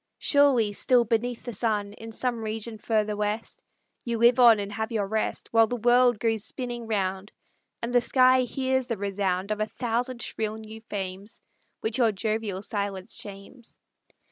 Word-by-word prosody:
Surely, 270 -8 +3
still 245 +3 +3
beneath 235 +2 -1
the 240 - -6
sun, 205 -1 -1
In 225 +1 -10
some 235 0 -2
region 220 0 -4
further 215 -1 0
west, 210 +2 -3 0.4
You 235 -1 -2
live 235 +2 +5
on 235 -3 +8
and 200 0 -4
have 220 +2 -3
your 215 -3 0
rest, 220 +2 -2
While 225 -1 +6
the 245 - -2
world 245 0 +4
goes 225 -2 0
spinning 240 -2 -6
round, 195 -2 -2 0.5
And 235 +1 -3
the 245 - +5
sky 255 +1 +5
hears 260 +1 -1
the 230 - -2
resound 195 -1 -2
Of 215 - -1
a 215 - 0
thousand 240 +1 -2
shrill 220 -1 -3
new 220 0 -10
fames, 195 +2 -5 0.4
Which 220 +3 -1
your 230 -3 +4
jovial 210 -1 -2
silence 200 -1 -3
shames! 205 +4 -11
220 Hz, 170 wpm, -26 LUFS, 205-240 Hz, 0.5 s, on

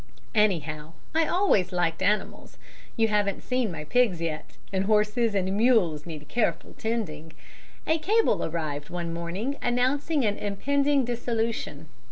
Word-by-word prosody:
"Anyhow, 160 -8 0 0.2
I 320 0 +2
always 350 - +2
liked 175 -2 0
animals 210 +1 -1 0.4
you 225 -1 +4
haven't 205 -2 0
seen 250 -5 0
my 155 -3 -6
pigs 210 +1 +2
yet 160 -2 -4 0.2
and 190 0 +1
horses 215 +1 +2
and 190 0 0
mules 200 -10 +3
need 155 -3 -8
careful 235 -2 -1
tending. 165 -9 -4 0.5
A 320 +1 +2
cable 430 +8 +2
arrived 155 -3 -3
one 170 -1 -4
morning 185 +12 -3
announcing 265 +4 +1
an 205 -1 0
impending 275 +7 +1
dissolution. 230 - -2
210 Hz, 135 wpm, -27 LUFS, 170-245 Hz, 0.5 s, you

